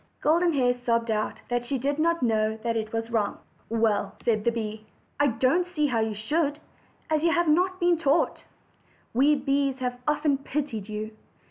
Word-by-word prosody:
Golden 335 +2 +3
Hair 250 -3 +3
sobbed 235 -2 0
out, 215 0 -2
"that 245 0 0
she 270 +3 -2
did 280 +4 -1
not 335 -1 +1
know 220 -2 +1
it 225 -2 -1
was 225 0 -3
wrong." 215 -3 0 0.3
'Well," 220 -3 +1
said 215 -3 0
the 235 - +2
bee, 215 -1 -5 0.3
"I 290 - +4
don't 255 +8 +2
see 345 -4 -1
how 245 -5 +1
you 220 -1 -1
should, 290 +7 0 0.5
as 310 -1 +2
you 335 +1 +3
have 345 0 +2
not 365 +4 +2
been 350 -2 +3
taught. 300 +1 +1 0.7
We 280 +5 +4
bees 275 -1 0
have 250 -1 -3
often 295 -2 +2
pitied 270 -8 -4
you. 215 +1 -5
255 Hz, 175 wpm, -26 LUFS, 225-300 Hz, 0.7 s, I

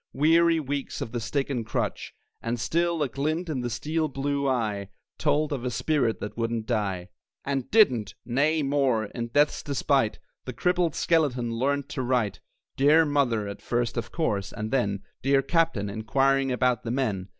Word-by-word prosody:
Weary 165 +3 +4
weeks 140 -2 -4
of 110 - -4
the 120 - -2
stick 135 +4 -1
and 120 -4 -1
crutch; 110 - -3 0.3
And 115 +1 -2
still 170 +6 +1
a - - 0
glint 155 +7 -2
in 135 -5 -2
the 120 - -2
steel 155 +7 -1
blue 140 0 -1
eye 105 -6 -1 0.3
Told 150 0 +1
of 130 -4 -4
a 125 - -1
spirit 125 -1 0
that 105 - -5
wouldn't 115 -1 -2
die. 100 -6 -2 0.4
And 135 -2 -2
didn't. 125 - +4
Nay, 145 +6 +1
more! 135 -5 +1
in 115 +3 -5
death's 145 +5 +2
despite 140 -5 +1 0.3
The 130 - -5
crippled 180 +1 +1
skeleton 135 -8 +1
learned 140 +4 0
to - - -3
write. 125 -5 0 0.4
"Dear 150 +4 +5
Mother," 130 -8 +1
at 100 - -7
first 120 -1 -1
of 115 -1 -4
course; 105 - -1
and 110 0 -5
then 100 -7 0 0.2
"Dear 135 +1 +3
Captain," 165 - +1
inquiring 135 +6 +1
about 125 -1 +1
"the 115 - -5
men." 110 -7 -1
130 Hz, 170 wpm, -26 LUFS, 115-145 Hz, 0.4 s, Dear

